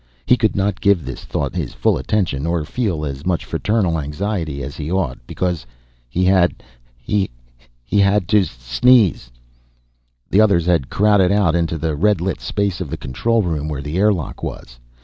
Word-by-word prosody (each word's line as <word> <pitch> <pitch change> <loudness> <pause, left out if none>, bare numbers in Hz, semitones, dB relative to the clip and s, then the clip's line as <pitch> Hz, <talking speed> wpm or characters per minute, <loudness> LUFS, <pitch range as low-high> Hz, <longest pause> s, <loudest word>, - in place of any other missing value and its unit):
He - - +5
could 110 -4 0
not 100 -1 -1
give 100 -7 +3
the 65 - -5
thought - - -4
his - - -4
full - - +2
attention, 80 -1 -1
or 85 -2 -1
feel 90 -6 -2
as 70 0 -5
much 90 -2 -1
fraternal 100 -6 0
anxiety 75 -1 -3
as 70 +1 -6
he 75 +1 -5
ought, 90 -10 -1
because 90 -5 -2 0.5
He 90 +9 0
had... 95 -2 +2 0.3
he 95 +10 -1 0.6
had 100 -2 +3
to 105 -2 +5
sneeze. 60 - +2 1.0
The 100 - +4
others 100 -6 +3
had 85 -7 +1
crowded 100 -3 +3
out 100 -5 +3
into 85 -1 0
the 80 -1 -2
red 100 +4 +2
lit 90 +2 -2
space 100 -3 -2
of 85 - -4
the - - -4
control 110 - 0
room, 80 -4 -2
where 70 -2 -4
the 75 +5 -3
airlock 100 -6 0
was. - - -7
90 Hz, 170 wpm, -19 LUFS, 75-100 Hz, 1.0 s, He